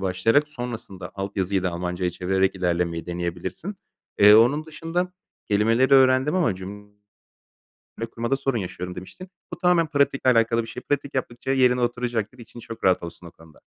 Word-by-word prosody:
başlayarak 100 +11 +2
sonrasında 115 -9 -7
alt 95 +1 -5
yazıyı 95 0 0
da 90 - 0
Almanca'ya 90 +1 -2
çevirerek 95 +2 0
ilerlemeyi 85 -2 -1
deneyebilirsin. 90 - -4 0.4
Eee, 105 +1 +8
onun 140 +8 +4
dışında 165 +4 -3 0.4
kelimeleri 115 +6 +3
öğrendim 130 +3 +4
ama 165 - +2
cüm 105 +2 -10 1.0
le 115 - -2
kurmada 115 +4 -2
sorun 135 -3 -1
yaşıyorum 90 -1 -5
demiştin. 140 - -10 0.2
Bu - - -6
tamamen 175 -2 +3
pratikle 140 -3 +2
alakalı 115 0 +3
bir 115 - -10
şey. 125 - -8
Pratik 140 0 -2
yaptıkça 130 0 -3
yerine 125 -2 +3
oturacaktır. 120 -1 -2
İçin 120 0 -12
çok 115 0 -9
rahat 95 -1 +3
olsun 85 +1 -9
o 85 - -10
konuda. 80 -2 -19
115 Hz, 160 wpm, -24 LUFS, 95-130 Hz, 1.0 s, Eee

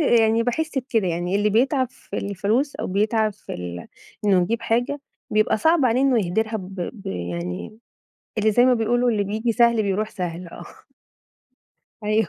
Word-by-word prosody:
آآ، 315 - +2 0.2
يعني 225 +1 +3
باحس 290 +4 -1
بكده، 235 -6 0
يعني 175 +2 -1
اللي 210 +1 +2
بيتعب 255 +3 +2
في 200 - -9
الفلوس 215 +8 -1
أو - - -3
بيتعب 215 +2 +1
في 205 - -11
ال 90 -1 -6 0.4
إنه 190 -3 +4
يجيب 230 +5 -1
حاجة، 245 +6 0 0.3
بيبقى 215 0 +3
صعب 320 +4 +3
عليه 250 +1 +3
إنه 265 -3 +4
يهدرها، 220 +5 0
ب 190 -2 -8 0.2
ب 210 -5 -13
يعني 90 - -5 0.6
اللي 215 +1 +3
زي 245 +4 +5
ما 255 0 +5
بيقولوا، 240 +2 +2
اللي 205 -2 +1
بييجي 220 +4 -1
سهل 235 -1 +4
بيروح 210 +2 -1
سهل، 175 -1 -5
آه. - - -10 1.4
أيوه 215 -2 +2
220 Hz, 170 wpm, -23 LUFS, 195-240 Hz, 1.4 s, زي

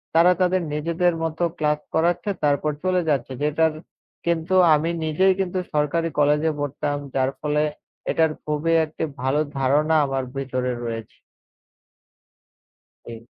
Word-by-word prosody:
তারা 170 +2 +6
তাদের 185 0 +2
নিজেদের 170 +3 +1
মত 160 -1 -3 0.2
ক্লাস 150 -1 +1
করাচ্ছে 175 +5 +1
তারপর 145 +1 +2
চলে 185 -1 +2
যাচ্ছে। 135 -3 0
যেটার 155 +2 +2 0.5
কিন্তু 170 +1 0 0.2
আমি 155 +3 0 0.2
নিজেই 185 +5 +3
কিন্তু 185 -1 -1
সরকারি 155 +3 +1
কলেজে 150 +2 +3
পড়তাম। 145 0 -2 0.2
যার 130 0 +2
ফলে 150 0 +1 0.5
এটার 160 -1 +2
খুবই 150 +2 0
একটি 155 +1 -6 0.2
ভালো 135 +3 +1 0.2
ধারণা 150 +4 +2
আমার 135 -1 -2
ভিতরে 130 -2 -2
রয়েছে। 115 -1 -6 1.9
জি। 115 0 -9
150 Hz, 125 wpm, -23 LUFS, 145-165 Hz, 1.9 s, তারা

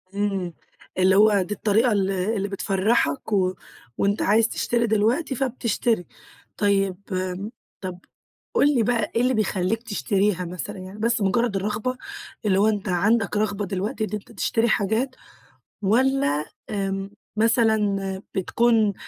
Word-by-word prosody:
إمم، 195 -4 -1 0.4
اللي 190 +1 +4
هو 205 -1 +5
دي 200 +3 -3
الطريقة 220 +3 +2
ال 195 -2 +1
اللي 195 +2 -1
بتفرحك، 195 -3 0
و 185 -2 +2 0.4
وأنت 200 +1 +1
عايز 220 +2 +4
تشتري 235 -1 0
دلوقتي 235 +7 +1
فبتشتري. 235 -6 0 0.5
طيب 195 -2 +1
آمم، 185 +3 -3 0.3
طب 185 -1 -5 0.5
قُل 290 0 +4
لي 235 - +3
بقى 225 -2 0
إيه 235 - +3
اللي 255 +1 +2
بيخليك 215 +1 0
تشتريها 200 -3 0
مثلًا 180 +4 -6
يعني 190 +3 -9
بس 230 -1 +1
مجرد 210 +2 +1
الرغبة؟ 210 +6 -2 0.5
اللي 195 -1 +3
هو 210 - +4
أنت 210 -2 -1
عندك 205 +4 +2
رغبة 205 -1 0
دلوقتي 200 +5 -3
إن - - -8
أنت 210 - -5
تشتري 230 0 0
حاجات؟ 225 +6 0 0.7
والّا 210 - +2 0.2
آمم 195 -1 -2 0.3
مثلًا 210 -4 +2
بتكون 220 +2 +2
205 Hz, 135 wpm, -24 LUFS, 195-225 Hz, 0.7 s, هو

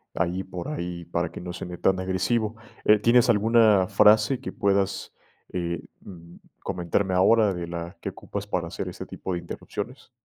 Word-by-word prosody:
ahí 90 +2 -1
por 90 +3 -6
ahí, 85 - -4
para 85 0 -2
que - - -8
no 90 0 -6
suene 90 -1 -6
tan 95 -1 +2
agresivo, 100 +4 0 0.3
eh, 105 - +6
¿tienes 120 +3 +4
alguna 110 -3 +5
frase 105 +4 +5
que - - -5
puedas, 100 -1 0 0.4
eh, 85 -2 -2 0.2
mm, 85 -2 -12 0.3
comentarme 90 +2 -1
ahora 100 +2 +4
de 85 -1 -5
la 85 0 -6
que - - -3
ocupas 100 0 -7
para 90 -4 -2
hacer - - -5
este - - -8
tipo 95 - -5
de 85 - -1
interrupciones? 115 +8 -7
95 Hz, 170 wpm, -25 LUFS, 85-105 Hz, 0.4 s, eh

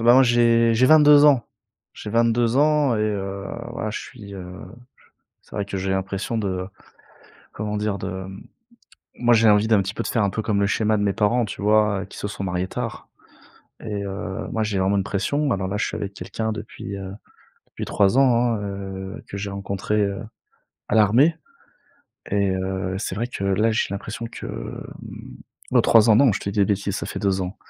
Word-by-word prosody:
bah, 120 +1 +6
moi 135 - +7
j'ai 115 -1 +4
j'ai 125 +3 +4
22 150 -1 +7
ans. 135 -7 +5 0.5
J'ai 105 - -8
22 115 +1 +2
ans 145 -4 +3
et - - -1
heu, 100 -2 -2 0.3
voilà 110 - -3
je - - -4
suis 105 -6 -11
heu, 90 -2 -7 1.0
c'est - - -12
vrai 100 - -1
que 100 0 -5
j'ai 95 0 -2
l'impression 95 +4 -2
de, 95 -3 -2 0.9
comment 105 0 -4
dire? 105 -1 -1
De, - - -4 0.2
mmh 95 +1 -10 0.7
moi 120 0 +3
j'ai 115 -1 +5
envie 105 +1 +4
d'un 105 -3 +5
petit 100 +2 -4
peu - - -3
de - - -4
faire 115 -4 +1
un 100 - +2
peu 110 - -3
comme 105 -2 0
le 100 - +2
schéma 110 0 +1
de 105 - 0
mes 100 -1 +1
parents, 115 +3 +2
tu 105 - -7
vois? 105 -1 +2
Qui - - -12
se 105 - -3
sont 100 - -6
mariés 90 0 -2
tard - - -5 0.7
et 105 -2 -4
heu, 95 -1 -5
moi 110 -1 0
j'ai 105 -2 -1
vraiment 95 +2 +2
une 95 - +1
pression. 140 +8 -1
Alors 95 -1 -2
là, 105 - -2
je - - 0
suis - - -5
avec 100 0 -4
quelqu'un 110 0 -4
depuis, 105 -2 -7
heu, 95 -1 -7 0.6
depuis - - -7
3 100 +3 +2
ans 120 -3 +4
hein, - - -4
heu, 95 0 -6
que 100 - -5
j'ai 100 0 -4
rencontré, 100 +2 -2
heu, 100 -1 -1 0.7
à - - -2
l'armée 115 +10 +5 1.0
et 100 -1 +1
heu, 95 0 -2
c'est 95 - -3
vrai 115 +5 -2
que 100 -5 -5
là, 105 +4 +2
j'ai 110 - 0
l'impression 105 +3 -5
que, - - -8
mmh, - - -8 0.4
heu, - - +7
3 115 0 +5
ans, 110 - +7
non, 130 -2 +5
je - - -3
te 100 - -3
dis 105 - -5
des 100 - +5
bêtises, 100 -1 -1
ça - - -4
fait - - -5
2 95 -1 0
ans. 95 +2 -4
105 Hz, 210 wpm, -23 LUFS, 100-115 Hz, 1.0 s, moi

